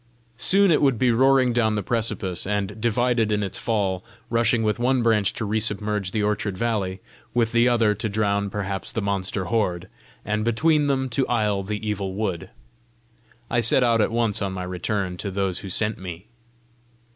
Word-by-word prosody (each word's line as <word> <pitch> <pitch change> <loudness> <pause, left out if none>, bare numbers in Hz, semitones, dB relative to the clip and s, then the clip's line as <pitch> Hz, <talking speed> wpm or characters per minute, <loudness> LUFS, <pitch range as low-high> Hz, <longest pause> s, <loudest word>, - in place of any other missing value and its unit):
Soon 195 +4 +4
it 155 - +3
would 135 -4 +3
be 125 +2 +3
roaring 130 +1 +4
down 110 -2 +2
the 105 - -2
precipice, 110 -7 -2
and, 105 +1 -2
divided 120 -1 +1
in 105 -1 +1
its 95 0 -4
fall, 100 -5 -1 0.3
rushing 115 0 +2
with 110 +1 0
one 125 0 +2
branch 110 -4 +3
to 110 - -3
resubmerge 105 -2 -1
the 105 +2 -1
orchard 105 -2 -1
valley, 100 -4 -1 0.3
with 115 -2 +2
the 115 +1 +4
other 115 -3 +3
to 105 +2 -3
drown 100 -1 0
perhaps 100 -2 -4
the - - -2
monster 95 -1 -2
horde, 90 -7 -1 0.4
and 105 +1 -1
between 150 +6 +2
them 135 -1 0
to 130 +2 -1
isle 105 -4 +1
the 105 +2 -4
Evil 100 -2 -3
Wood. 95 -5 -3 1.0
I 120 - +1
set 115 +3 +4
out 115 -2 +3
at 105 - +1
once 115 -2 +1
on 100 -1 -2
my 90 -1 -4
return 90 +1 -3
to 100 - -4
those 95 -1 -1
who 100 - -8
sent 105 +3 -1
me. 90 0 -8
105 Hz, 180 wpm, -24 LUFS, 100-115 Hz, 1.0 s, Soon